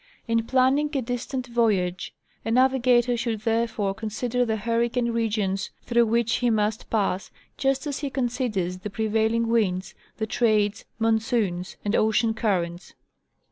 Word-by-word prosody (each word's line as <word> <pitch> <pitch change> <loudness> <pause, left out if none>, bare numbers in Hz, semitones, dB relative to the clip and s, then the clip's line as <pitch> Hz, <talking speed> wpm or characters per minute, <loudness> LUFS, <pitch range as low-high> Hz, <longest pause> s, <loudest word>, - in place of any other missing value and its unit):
In 230 0 +1
planning 265 +3 +3
a 270 - +1
dis 245 +1 -3
tant 260 -2 -3
voyage 210 -7 0 0.3
a - - -3
navigator 250 -1 +3
should 230 -2 -2
therefore 225 -3 0
consider 225 +4 -2
the 225 -2 0
hurricane 235 +2 0
regions 210 -4 -1
through 235 -1 +3
which 230 0 +1
he 245 - +1
must 215 -1 0
pass, 195 -3 0 0.3
just 270 +1 0
as 285 -2 -3
he 285 - -3
considers 240 -9 -2
the 210 - -5
pre 220 +2 -2
vailing 220 +2 +1
winds—the 195 -1 -1
trades, 215 -2 +1
monsoons, 220 -5 0
and 205 +2 +1
ocean 220 +1 +2
currents. 180 -5 -2
225 Hz, 140 wpm, -25 LUFS, 210-240 Hz, 0.3 s, planning